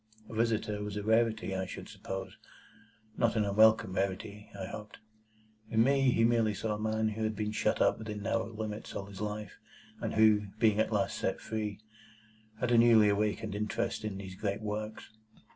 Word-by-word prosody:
A - - -10
visitor 110 -2 0
was 105 0 -4
a 105 - -3
rarity, 110 -2 +2
I 95 0 -2
should - - -8
suppose; 95 -1 -6 0.8
not 120 -1 +2
an 110 -2 +2
unwelcome 110 -1 +4
rarity, 100 +2 -3
I 95 - -3
hoped? 105 +2 -8 0.7
In 110 0 +4
me, 135 +1 +3
he 115 -2 +3
merely 115 -2 +3
saw 105 +2 -2
a 105 - -4
man 110 0 0
who 110 +1 -5
had 110 0 0
been 105 0 -2
shut 110 - 0
up - - +2
within 105 -2 -5
narrow 115 +2 -1
limits 110 -1 -5
all 100 - -4
his 100 0 -10
life, 105 -1 -5 0.4
and - - -3
who, 110 -1 +5
being 110 -2 +3
at 110 - +2
last 100 -2 0
set - - -1
free, 105 -2 -4 0.8
had 125 0 0
a 120 - +6
newly 115 -3 +6
awakened 105 +1 0
interest 110 +3 -2
in 105 -3 -3
these 95 -1 -7
great 100 +2 -3
works. 105 +1 -5
105 Hz, 185 wpm, -31 LUFS, 105-110 Hz, 0.8 s, a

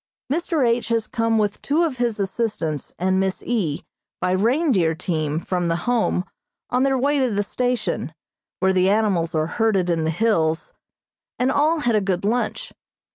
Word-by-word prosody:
Mr. 320 -5 +1
H. 235 +1 +1
has 230 -2 0
come 230 -1 0
with 210 -2 0
two 310 +5 +1
of 300 -6 -1
his 235 -3 -1
assistants 190 - -2
and 190 +1 +1
Miss 190 -1 -1
E. 190 -12 -1 0.3
by 180 - 0
reindeer 210 - +2
team 155 -3 -2
from 175 0 -2
the 165 - +1
Home 230 -6 +1 0.5
on 250 - +2
their 270 0 +2
way 280 +3 +1
to 260 -2 +2
the 205 -2 0
station, 250 +3 -2 0.5
where 190 0 +3
the 185 0 +3
animals 195 -6 +1
are 155 0 +2
herded 195 -1 +1
in 165 -1 0
the 160 - 0
hills, 165 -4 0 0.6
and 255 +2 +2
all 305 +3 +2
had 240 -5 +2
a 210 - +3
good 190 -1 -1
lunch. 240 - -1
215 Hz, 175 wpm, -22 LUFS, 180-245 Hz, 0.6 s, where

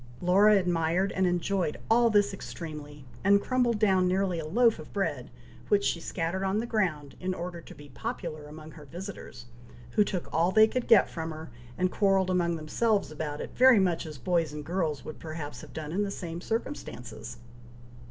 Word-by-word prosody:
Laura 200 +4 +5
admired 175 +1 +1
and 190 0 +1
enjoyed 175 -1 0
all 235 +1 +4
this 205 -2 +3
extremely, 150 -6 -8 0.2
and 200 +1 +5
crumbled 245 0 +1
down 190 -3 +3
nearly 185 -1 0
a 155 - -5
loaf 230 +3 +3
of 155 - -10
bread, 145 -11 -2 0.4
which 200 -1 +3
she 170 - 0
scattered 170 +3 -3
on 195 +1 0
the 225 - -1
ground, 170 - -1
in 185 0 -2
order 175 -1 -6
to - - -13
be 145 - -13
popular 160 - -5
among 155 +1 -10
her 150 -2 -12
visitors, 170 - -8 0.5
who 210 - +4
took 190 -4 -3
all 170 +3 +3
they 215 +3 +7
could 250 +2 -3
get 225 -3 +6
from 160 -1 -5
her, 155 -3 -8 0.3
and 185 0 +1
quarrelled 195 -2 +2
among 170 -2 +1
themselves 195 +6 0
about 150 -1 -4
it, - - -6
very 255 -3 +7
much 175 -4 +1
as 155 -2 -8
boys 165 +3 0
and 150 -1 -7
girls 160 -4 -2
would 155 - -8
perhaps 155 -2 -6
have - - -12
done 155 -1 -6
in 190 +5 0
the 205 - -1
same 175 -3 -6
circumstances. 125 - -5
180 Hz, 190 wpm, -28 LUFS, 155-200 Hz, 0.5 s, they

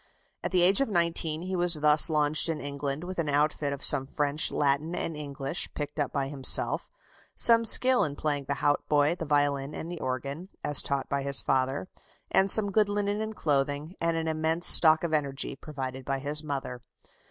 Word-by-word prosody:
At - - -2
the 180 -2 +2
age 195 +8 +4
of 275 - -1
nineteen, 170 -3 -1
he 185 +1 -5
was 175 -1 +3
thus 150 +1 +5
launched 150 +1 +2
in 160 -2 -3
England 140 +1 -5
with 180 0 -7
an 155 -3 -2
outfit 145 0 -1
of 140 0 -6
some 135 -2 +6
French, 145 +1 0
Latin, 145 +4 -1
and 165 - -4
English, 140 +1 -4
picked 150 +1 -6
up 145 - -2
by 135 -1 -3
himself; 135 -2 +3 0.5
some 230 -1 +4
skill 255 +3 +2
in 145 -2 -4
playing 145 -2 -3
the 140 - -3
hautboy, 145 +1 0
the 165 - -7
violin, 145 -1 -1
and 165 - -7
the 175 - -7
organ, 140 +7 -6
as 145 - +5
taught 140 -1 -4
by 140 0 -3
his 140 0 +2
father; 135 +5 -2 0.4
and 195 +1 +2
some 205 0 +5
good 210 0 +1
linen 205 +1 -3
and 220 0 -6
clothing, 145 +1 -2
and 165 0 -1
an 160 0 -4
immense 160 +2 -1
stock 160 -1 +6
of 165 -2 -3
energy, 140 -3 -2
provided 135 -2 -8
by 135 +1 -3
his 145 +3 -2
mother. 135 -4 -6
150 Hz, 195 wpm, -26 LUFS, 140-170 Hz, 0.5 s, some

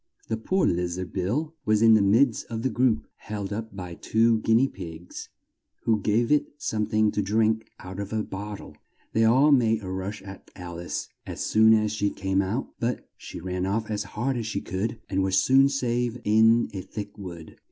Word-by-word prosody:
The 110 - 0
poor 185 +12 +1
liz 90 0 0
ard, 95 -1 -6
Bill, 125 - -1
was 110 0 +2
in 115 -1 +7
the 110 - +5
midst 110 +5 +3
of 115 -1 -5
the 130 - 0
group, 120 -1 +2
held 100 -1 -5
up 110 -1 -6
by 90 -2 -6
two 115 +5 +2
guin 115 +2 +3
ea 135 - +3
pigs, 85 -6 -9 0.5
who 110 -2 +2
gave 115 +5 +1
it 150 -1 +2
some 105 -7 -2
thing 110 -1 +2
to 105 - -1
drink 110 +2 +1
out 95 +2 -8
of 100 0 -5
a 110 -1 -1
bot 105 +1 -6
tle. - - -12 0.4
They 110 0 +3
all 130 +7 +5
made 115 -5 +3
a 95 - -5
rush 95 +2 -5
at 95 0 -11
Al 85 -2 -7
ice, 85 - -4 0.2
as - - -6
soon 110 +1 +5
as 105 -1 +1
she 105 -1 0
came 95 -1 0
out, 100 +7 -3
but 120 +1 -2
she - - -9
ran 90 +1 -3
off 110 +2 -1
as 105 -1 -1 0.2
hard 130 +3 0
as 115 -2 -3
she 100 - -2
could, 105 +5 -3
and 95 0 0
was 95 0 +2
soon 135 +7 +5
safe 125 -3 -1
in 110 +2 +4
a 95 - -4
thick 100 +2 -7
wood. 85 -4 -9
110 Hz, 210 wpm, -26 LUFS, 95-115 Hz, 0.5 s, in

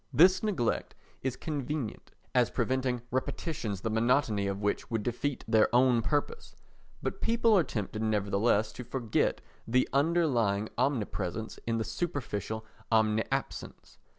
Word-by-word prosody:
This 185 +4 +6
neglect 190 - -1 0.3
is 130 -1 -1
convenient 145 -5 -4 0.2
as - - +4
preventing 130 -2 0
repetitions 130 - -2
the 110 - -2
monotony 110 -3 +2
of 100 0 -2
which 105 0 -1
would 115 -3 -1
defeat 125 +4 -2
their 110 -1 +4
own 125 -2 +5
purpose, 150 - -2 0.5
but - - -3
people 230 -1 +3
are 185 - +5
tempted 110 -4 -4
nevertheless 105 0 +2
to 125 - -8
forget 120 -2 0 0.3
the 125 +2 +3
underlying 135 -10 +2
omnipresence 110 -5 -1
in 115 -1 +1
the 110 - 0
superficial 110 - -3 0.3
omniabsence. 110 +4 -1
120 Hz, 125 wpm, -30 LUFS, 110-145 Hz, 0.5 s, This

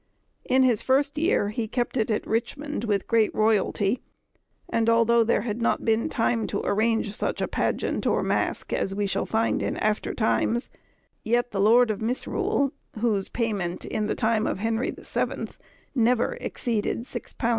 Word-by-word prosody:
In 260 +1 +4
his 240 -5 +3
first 280 +2 +1
year 305 - +2
he 220 +1 -3
kept 240 +3 -2
it 225 -3 +1
at 215 - 0
Richmond 240 +3 -2
with 205 -3 0
great 225 -2 +3
royalty, 215 +1 +1 0.7
and 230 0 +1
although 230 0 +4
there 230 - +1
had 230 0 -3
not 230 - +1
been 225 0 +2
time 230 -1 0
to 200 - -3
arrange 220 0 +1
such - - -1
a - - 0
pageant - - -1
or - - +2
masque - - -1
as 195 - -1
we 205 0 0
shall 195 - -1
find 225 +1 +1
in - - -2
after 215 0 -1
times, 235 +2 0 0.5
yet 240 +2 +1
the 195 - -1
lord 230 +3 +5
of 210 - -5
Misrule, 255 +3 0 0.3
whose 210 -4 0
payment, 200 -7 -2
in 210 -1 -2
the - - -1
time 220 -1 +1
of - - -1
Henry 225 +4 -1
the - - -8
Seventh, - - -3 0.3
never 245 - +2
exceeded 230 -3 -2
£6 240 -1 -8
13_s. 230 - -1
225 Hz, 175 wpm, -25 LUFS, 215-240 Hz, 0.7 s, lord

